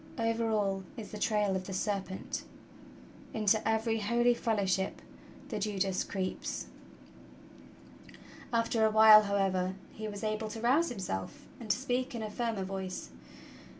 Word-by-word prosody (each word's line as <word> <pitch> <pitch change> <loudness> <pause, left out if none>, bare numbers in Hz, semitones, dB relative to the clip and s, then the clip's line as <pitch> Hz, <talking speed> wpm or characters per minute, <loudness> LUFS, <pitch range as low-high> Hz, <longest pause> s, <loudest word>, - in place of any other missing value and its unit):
Over 230 0 0
all 200 -3 0
is 215 -3 -7
the 210 - -6
trail 210 -3 +1
of 185 -1 -3
the 190 - -5
serpent! 195 -1 -3 0.9
Into 215 0 +3
every 225 0 +1
holy 235 +3 +3
fellowship 200 -5 0 0.5
the 215 -5 -3
Judas 195 -2 0
creeps!" 190 -2 -3 1.9
After 230 -1 +1
a 220 - +5
while, 215 0 +9
however, 190 -2 0 0.2
he 215 0 -5
was 205 0 -6
able 215 0 -1
to 220 +1 -6
rouse 270 +9 +3
himself 180 - -5
and 230 -3 -9
to - - +3
speak 255 0 -2
in 225 - -3
a 215 - -4
firmer 225 -3 -2
voice. 190 -1 -5
215 Hz, 140 wpm, -31 LUFS, 195-225 Hz, 1.9 s, while